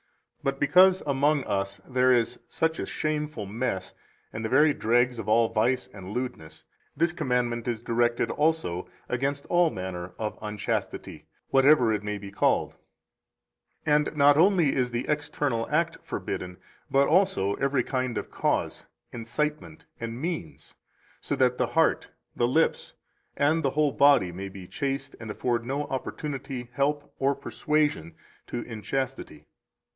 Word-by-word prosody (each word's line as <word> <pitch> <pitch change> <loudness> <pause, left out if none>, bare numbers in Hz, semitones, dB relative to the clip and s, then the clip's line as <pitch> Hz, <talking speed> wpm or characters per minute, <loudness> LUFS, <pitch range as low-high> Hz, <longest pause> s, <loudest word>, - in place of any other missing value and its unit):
202 - - -37
But 135 0 -1
because 185 +5 +5
among 145 +1 +2
us 100 -2 -2
there 130 0 +3
is 120 -2 +1
such 160 0 0
a - - -3
shameful 150 -7 -2
mess 100 -2 -3 0.4
and 110 - -5
the 110 - -2
very 145 +4 +5
dregs 120 +1 +2
of 110 -1 -4
all 115 +1 +4
vice 125 +3 +1
and 95 -2 -9
lewdness, 125 -10 -5 0.3
this 165 +1 +2
commandment 125 -6 -1
is 115 -2 -2
directed 120 0 +1
also 150 - 0 0.2
against 140 +3 -2
all 175 -1 +3
manner 90 - -6
of 110 -1 -4
unchastity, 105 -1 -4 0.2
whatever 135 -4 +5
it 105 - -1
may 105 0 -3
be 100 0 -9
called; 100 - +1 1.1
203 150 - +3 0.2
and 155 - -13
not 145 0 +6
only 175 -4 +4
is 125 -2 +1
the 120 +2 -3
external 145 -5 -1
act 165 +2 0
forbidden, 90 0 -5 0.3
but 140 +1 +4
also 155 - +2
every 135 -2 +1
kind 130 -3 -2
of - - -5
cause, - - -1 0.2
incitement, 120 - -3
and 115 +1 -5
means, 165 - -5 0.5
so - - -2
that 125 -1 +2
the - - +2
heart, - - +2 0.3
the 120 - +2
lips, 160 +6 +1 0.4
and 155 +3 +3
the 140 - +1
whole 150 +1 +2
body 140 -12 +4
may 95 +3 -6
be 95 -2 -10
chaste 140 - -3
and 115 - -8
afford 115 +2 -1
no 135 +4 -2
opportunity, 135 -2 -5
help, 145 +3 -1
or 140 +1 +2
persuasion 140 - -1 0.3
to 120 - -4
inchastity. 115 - -4
130 Hz, 150 wpm, -27 LUFS, 110-145 Hz, 1.1 s, not